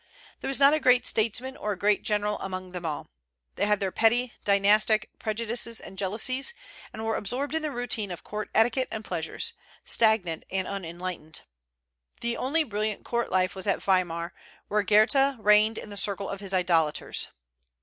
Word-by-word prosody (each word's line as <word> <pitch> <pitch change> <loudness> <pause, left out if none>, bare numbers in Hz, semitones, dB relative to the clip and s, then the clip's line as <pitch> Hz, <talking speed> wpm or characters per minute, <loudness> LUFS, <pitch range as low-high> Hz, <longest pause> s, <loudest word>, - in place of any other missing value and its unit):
There - - -5
was 270 0 +2
not 280 +1 +7
a 310 - +2
great 250 -3 +4
statesman 235 +4 0
or 210 -4 -3
a - - -9
great 205 +2 +2
general 210 0 0
among 185 -1 -5
them 175 -2 -5
all. 150 - -5 0.4
They 205 - 0
had 210 -1 +2
their 195 -1 -1
petty 240 +4 +2
dynastic 210 +2 +3
prejudices 230 +1 -2
and 190 - -10
jealousies, 230 - +1 0.4
and 220 0 -6
were 225 - 0
absorbed 260 +9 -3
in 320 - 0
the 310 - -2
routine 240 -5 -1
of 175 - -7
court 210 0 -5
etiquette 240 +3 +3
and 220 -1 -6
pleasures, 310 - -3 0.3
stagnant 215 -8 +2
and 190 -1 -1
unenlightened. 175 -4 -5 0.8
The 235 0 0
only 310 +5 +1
brilliant 215 -4 -2
court 235 0 -1
life 185 0 +2
was 190 +1 -5
at 195 - 0
Weimar, 175 -3 0 0.4
where 210 0 +2
Goethe 235 +7 +4
reigned 215 +1 +4
in 210 - -7
the 205 - -8
circle 200 0 -1
of 200 - -5
his 195 -1 -7
idolaters. 170 -5 0
210 Hz, 175 wpm, -27 LUFS, 190-235 Hz, 0.8 s, not